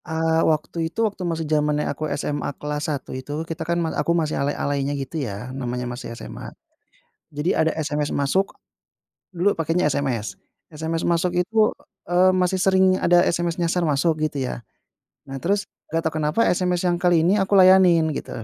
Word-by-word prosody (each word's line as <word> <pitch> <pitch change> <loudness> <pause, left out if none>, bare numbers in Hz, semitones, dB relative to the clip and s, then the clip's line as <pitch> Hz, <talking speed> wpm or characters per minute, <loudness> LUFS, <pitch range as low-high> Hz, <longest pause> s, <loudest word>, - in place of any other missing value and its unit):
Eee, 160 -1 +1
waktu 160 +1 0
itu 225 +7 0
waktu 205 -3 -3
masih 165 -1 -2
zamannya 150 -1 +1
aku 155 - -4
SMA 145 0 -2
kelas 150 +1 -3
1 145 -3 -4
itu, 145 +5 -5
kita 165 0 -6
kan 170 - +1
mal 165 -2 -1
aku 170 +4 +1
masih 155 -2 -1
alay-alaynya, 140 0 -1
gitu 140 +3 -4
ya, 120 +1 -5
namanya 125 -2 -4
masih 120 -1 -6
SMA - - -8 0.8
jadi 150 +4 0
ada 160 - +1
SMS 150 -1 -2
masuk 165 +8 0 0.8
dulu 185 +2 +1
pakainya 165 +2 0
SMS. 120 -8 -2 0.4
SMS 160 +2 -3
masuk 175 +1 +1
itu, 215 +4 +3 0.4
eee, 180 +1 +5
masih 185 0 +1
sering 190 0 +3
ada 175 -1 +4
SMS 170 0 -1
nyasar 170 +1 +1
masuk, 155 +2 +1
gitu 145 -2 -3
ya. 125 -2 -4 0.6
Nah, 135 - -6
terus 200 +2 0 0.2
nggak 165 +1 0
tahu 160 - -1
kenapa, 150 +10 +2
SMS 180 0 +1
yang 175 - +2
kali 175 -2 +3
ini 200 +3 +3
aku 195 - -5
layanin 185 -3 +6
gitu, - - -6
160 Hz, 175 wpm, -23 LUFS, 145-180 Hz, 0.8 s, layanin